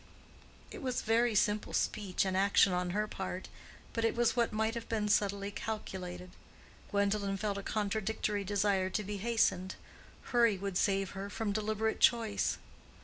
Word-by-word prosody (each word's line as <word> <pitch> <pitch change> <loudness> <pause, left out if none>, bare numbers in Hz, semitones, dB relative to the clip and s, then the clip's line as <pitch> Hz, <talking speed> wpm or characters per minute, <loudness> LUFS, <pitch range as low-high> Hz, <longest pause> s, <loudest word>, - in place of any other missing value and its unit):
It 415 - -8
was 255 -3 -2
very 230 +1 +2
simple 210 0 +1
speech 200 -4 0
and 190 -1 -1
action 195 -1 +4
on 180 0 0
her 210 +4 0
part, 190 -2 -5 0.4
but 230 - -1
it 225 - +2
was 240 +1 +2
what 235 -2 +2
might 220 +1 0
have 230 -1 -6
been 215 -2 0
subtly 200 -1 +1
calculated. 185 -4 -5 0.6
Gwendolen 200 -1 0
felt 200 0 -2
a - - -5
contradictory 210 0 -1
desire 195 -1 +1
to 210 - -2
be 205 +1 -4
hastened: 195 -4 +1 0.6
hurry 235 -4 +4
would 195 -1 -2
save 195 -1 +1
her 200 +1 -6
from 210 0 -2
deliberate 215 +1 -1
choice. 225 -4 +3
205 Hz, 155 wpm, -32 LUFS, 195-220 Hz, 0.6 s, action